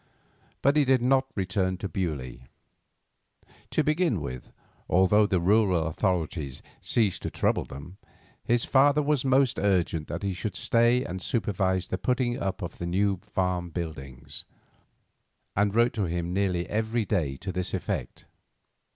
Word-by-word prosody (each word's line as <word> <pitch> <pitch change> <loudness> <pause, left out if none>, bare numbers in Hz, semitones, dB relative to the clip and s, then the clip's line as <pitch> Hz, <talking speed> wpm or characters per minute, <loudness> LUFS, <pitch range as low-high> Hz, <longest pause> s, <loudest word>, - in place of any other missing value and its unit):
But 140 +3 +4
he 150 - +5
did 130 -2 +3
not 135 +1 +3
return 95 -1 0
to 100 - -4
Beaulieu. 75 -11 -4 1.3
To 155 - +1
begin 155 - +1
with, 65 -4 -7 0.4
although 100 +4 +4
the 95 -3 +1
rural 95 -2 +3
authorities 80 -5 -2 0.2
ceased 105 -6 +1
to - - -3
trouble - - 0
them, 75 +8 -10 0.4
his 120 0 +1
father 145 +2 +4
was 145 -2 +1
most 135 -1 +3
urgent 90 -5 +1
that 85 - -5
he 100 -1 -1
should 95 +2 -4
stay 120 +4 +2
and 95 +1 -5
supervise 95 -4 -1
the 95 - -2
putting 125 +2 0
up 95 -1 -3
of 85 - -7
the 85 - -3
new 100 +2 +1
farm 90 -3 -2
buildings, 70 -7 -7 1.1
and 100 +1 +1
wrote 120 +1 +4
to 105 -4 -1
him 85 0 -2
nearly 90 -3 0
every 110 +1 -1
day 80 -10 -1
to 95 - -5
this 90 0 -3
effect. 60 - -4
95 Hz, 150 wpm, -27 LUFS, 85-115 Hz, 1.3 s, he